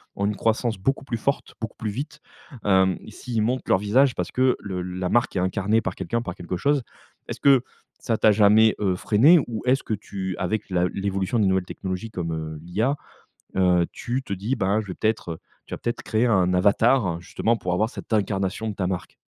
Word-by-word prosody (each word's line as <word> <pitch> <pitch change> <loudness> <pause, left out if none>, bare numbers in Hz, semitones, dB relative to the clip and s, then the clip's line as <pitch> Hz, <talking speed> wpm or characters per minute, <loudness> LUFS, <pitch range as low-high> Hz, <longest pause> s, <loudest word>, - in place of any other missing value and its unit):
ont 100 - -1
une 105 0 -1
croissance 115 -1 0
beaucoup 135 +8 -1
plus 120 -4 -3
forte, 140 +5 -2
beaucoup 110 - -6
plus 110 -2 -3
vite, 150 +6 -6 0.4
hem, 95 -2 +3
s'ils 115 -3 -3
montent 125 +4 -1
leur - - +4
visage 120 +6 +3
parce 90 - -3
que 130 0 +3
le 95 -3 -4
la 90 0 -3
marque 120 -3 +1
est - - +1
incarnée 100 +4 +1
par - - -4
quelqu'un, 115 0 -2
par 90 -6 -6
quelque 90 +1 -5
chose. 140 +5 +2 0.5
Est-ce - - -6
que 135 -3 +5 0.4
ça 115 -3 0
t'a 110 - +5
jamais, 105 +1 +5
heu, 95 -3 +1
freiné 125 - +5
ou 115 -3 -4
est-ce 130 +2 +3
que 110 - -3
tu 95 -2 -4
avec 95 +2 -2
la 90 0 +2
l'évolution 100 +2 -1
des 105 - +3
nouvelles 95 -1 +1
technologies 95 +4 -5
comme, 85 -5 -4
heu, 80 -1 -5
l'IA, 110 - -1 0.6
heu, 90 -2 +3
tu 125 +2 -3
te 100 - -4
dis, 105 +7 -2
ben 100 +2 +1
je 105 - -10
vais 95 - -4
peut-être, 110 -6 -1
heu, 80 - -5 0.3
tu - - -9
vas - - -3
peut-être 120 - -3
créer 110 +2 +1
un 95 -6 +3
avatar 100 -1 +3
justement 115 +5 0
pour 90 -5 -3
avoir 110 +5 +1
cette - - -10
incarnation 100 0 0
de 105 - -4
ta 95 -2 -1
marque? 90 -2 -4
105 Hz, 215 wpm, -24 LUFS, 95-115 Hz, 0.6 s, que